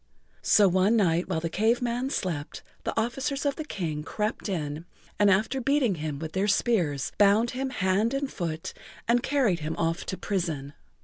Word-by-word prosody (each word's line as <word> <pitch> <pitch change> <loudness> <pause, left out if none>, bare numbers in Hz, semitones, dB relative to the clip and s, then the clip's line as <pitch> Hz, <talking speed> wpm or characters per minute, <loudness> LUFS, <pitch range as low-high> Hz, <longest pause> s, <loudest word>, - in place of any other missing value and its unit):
So 205 -2 +5
one 190 +4 +3
night 180 -4 +2
while 165 -4 0
the 165 - -1
Cave 220 +8 +2
Man 245 +2 -1
slept 170 - -3 0.2
the - - 0
officers 270 +5 -2
of 280 -1 +1
the 310 - -4
King 165 - -3
crept 210 +7 -3
in, 155 -3 -3 0.3
and 205 -1 +5
after[Pg 195 +2 +5
52] 265 +4 -4
beating 265 -5 +2
him 155 -2 -3
with 160 +1 -5
their 190 +4 0
spears, 180 - +1
bound 210 +3 +5
him 265 +1 -2
hand 205 +3 +1
and 275 0 -2
foot 165 -3 -4 0.3
and 240 +1 +3
carried 245 -12 +1
him 155 +1 -3
off 165 +1 0
to 190 - -3
prison. 160 -8 -2
200 Hz, 185 wpm, -27 LUFS, 165-240 Hz, 0.3 s, So